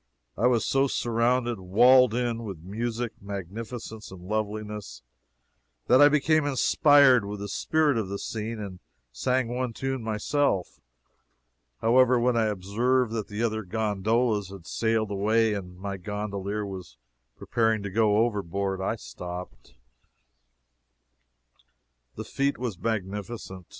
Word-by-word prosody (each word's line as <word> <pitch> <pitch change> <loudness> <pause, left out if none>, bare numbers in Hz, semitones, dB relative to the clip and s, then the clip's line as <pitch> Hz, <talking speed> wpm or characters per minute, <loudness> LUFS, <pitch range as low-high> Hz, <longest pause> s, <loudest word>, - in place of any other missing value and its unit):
I 115 - +2
was 120 -3 +2
so 135 +1 +2
surrounded, 120 -1 0
walled 120 +6 +5
in, 120 -2 -1
with 95 -7 -7
music, 115 +4 -3
magnificence 105 +3 -7
and 90 -2 -11
loveliness, 105 - -4 0.8
that 130 +3 +5
I 145 - +9
became 150 +1 +3
inspired 140 -2 +5
with 100 0 -6
the 100 - -5
spirit 150 +5 +1
of 100 -4 -3
the 100 - -3
scene, 110 +2 -5
and 95 -3 -7 0.3
sang 125 - 0
one 125 -1 -2
tune 135 +1 -3
myself. 110 -1 -1 1.0
However, 125 +2 +4
when 125 +1 +2
I 115 -1 +2
observed 110 +5 0
that 110 -3 -3
the 105 +2 -3
other 110 -1 0
gondolas 110 +1 0
had 95 -3 -11
sailed 110 0 0
away, 110 +2 +2
and 90 -3 -6
my 100 +1 -5
gondolier 105 +1 -4
was 90 -11 -8 0.4
preparing 110 -2 0
to 100 - -5
go 110 +1 +3
overboard, 100 -3 -2
I 95 - -1
stopped. 90 - -9 2.4
The - - -5
fete 140 +1 -1
was 120 -8 -4
magnificent. 105 -3 -4
110 Hz, 130 wpm, -27 LUFS, 100-120 Hz, 2.4 s, I